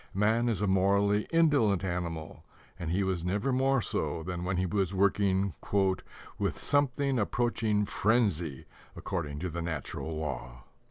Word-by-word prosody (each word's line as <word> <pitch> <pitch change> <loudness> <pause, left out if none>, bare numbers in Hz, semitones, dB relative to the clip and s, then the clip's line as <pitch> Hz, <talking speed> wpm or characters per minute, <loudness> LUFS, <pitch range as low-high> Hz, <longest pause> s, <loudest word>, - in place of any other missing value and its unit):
Man 110 +4 +2
is 105 -4 -1
a - - +2
morally 100 +2 +2
indolent 145 - +3
animal, 85 -4 -4 0.4
and 85 - -4
he 95 +4 +1
was 95 -3 -1
never 100 +9 0
more 135 -2 +2
so 85 -2 -2
than 90 0 -4
when 90 +1 -1
he 95 - +1
was 95 0 -1
working 100 -1 +2 0.9
"with - - -1
something 140 -2 +1
approaching 110 -1 +1
frenzy 100 - 0 0.3
according 80 -7 -4
to 90 - -2
the 85 +2 -4
natural 80 -1 -4
law." - - -5
95 Hz, 145 wpm, -30 LUFS, 85-110 Hz, 0.9 s, indolent